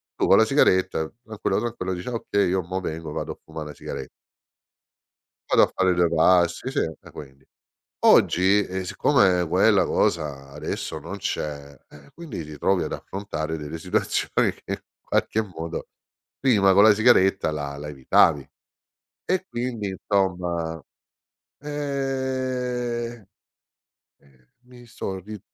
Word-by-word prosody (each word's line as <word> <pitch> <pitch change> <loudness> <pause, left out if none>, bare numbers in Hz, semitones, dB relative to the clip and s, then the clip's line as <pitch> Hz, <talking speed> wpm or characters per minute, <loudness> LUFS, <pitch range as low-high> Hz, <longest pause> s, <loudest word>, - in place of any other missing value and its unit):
tu - - +1
con - - +7
la - - +6
sigaretta, 95 -4 +2 0.2
tranquillo, 110 -3 -2
tranquillo, 115 -5 -3
dici: 90 0 -7
"Ah, 125 - -3
okay, 100 -3 0
io 95 0 0
mo 95 +3 -3
vengo, 80 -3 -5
vado - - -4
a - - -22
fumà 80 - -8
na 75 -1 -8
sigare" 65 - -6 1.4
Vado - - +6
a - - -5
fare 95 -1 +2
due 85 -1 +3
passi, 85 +8 +3
sì, - - -3
eh 80 - -3
quindi. 70 -2 -12 0.6
Oggi, 100 +3 +5
ehm, 95 0 -4
siccome 95 -3 +2
quella - - +4
cosa 70 -4 -1
adesso - - -4
non - - -7
c'è, 70 -1 -4
eh 70 -1 -16
quindi 165 - -7
ti 75 0 -9
trovi 95 +6 +1
ad - - -5
affrontare 80 -5 -5
delle 75 +2 -6
situazioni 80 - 0
che - - -23
in - - -1 0.3
qualche 110 - 0
modo 85 -4 -6 0.5
prima 105 -8 +4
con 100 +2 +6
la 110 -1 +7
sigaretta 95 -6 +4
la 70 -2 -4
la 75 +1 -7
evitavi. 70 +1 +3 0.8
E 185 0 0
quindi, 120 -4 -3
insomma, 90 -4 -1 0.8
ehm, 130 -5 -3 0.9
eh, 65 -3 -27
mi 125 -1 -16
sò 95 -4 -5
ri 105 +2 -9
95 Hz, 140 wpm, -24 LUFS, 80-115 Hz, 1.4 s, con